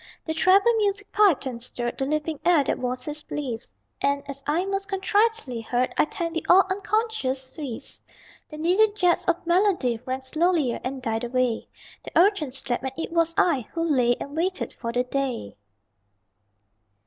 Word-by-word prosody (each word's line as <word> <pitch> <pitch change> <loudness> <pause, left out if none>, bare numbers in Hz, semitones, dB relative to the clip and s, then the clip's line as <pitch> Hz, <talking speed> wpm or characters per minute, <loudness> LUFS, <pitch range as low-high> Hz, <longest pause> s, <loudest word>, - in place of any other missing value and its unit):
The 320 - -2
treble 390 +8 +4
music 405 -1 -1
piped 400 -10 +4
and 245 -3 -5
stirred, 240 0 -4
The 270 - 0
leaping 305 0 -2
air 340 -5 +4
that - - -1
was 250 0 -3
his 300 0 -4
bliss; 250 -7 -5 0.3
And, 280 0 0
as 275 -1 -7
I 325 +5 +1
most 390 0 -2
contritely 405 - 0
heard, 245 +2 -1
I - - +4
thanked 340 -2 -4
the 330 - -3
all 380 +2 +7
unconscious 415 - -1
Swiss! 280 -8 -7 0.5
The 305 - -8
needled 385 +7 +3
jets 360 -4 +2
of 345 -1 0
melody 345 - +2
Rang 260 +1 -3
slowlier 310 -1 +1
and 260 0 -4
died 225 -1 -1
away 245 -1 0 0.3
The - - -5
Urchin 355 -4 +4
slept; 250 -2 -2
and 265 - -2
it 330 - -4
was 335 0 +1
I 275 -10 +2
Who 330 - -1
lay 250 -7 +3
and 280 - -7
waited 365 +3 -1
for 230 - -5
the 245 +1 +1
day. 255 - -3
305 Hz, 170 wpm, -25 LUFS, 255-370 Hz, 0.5 s, all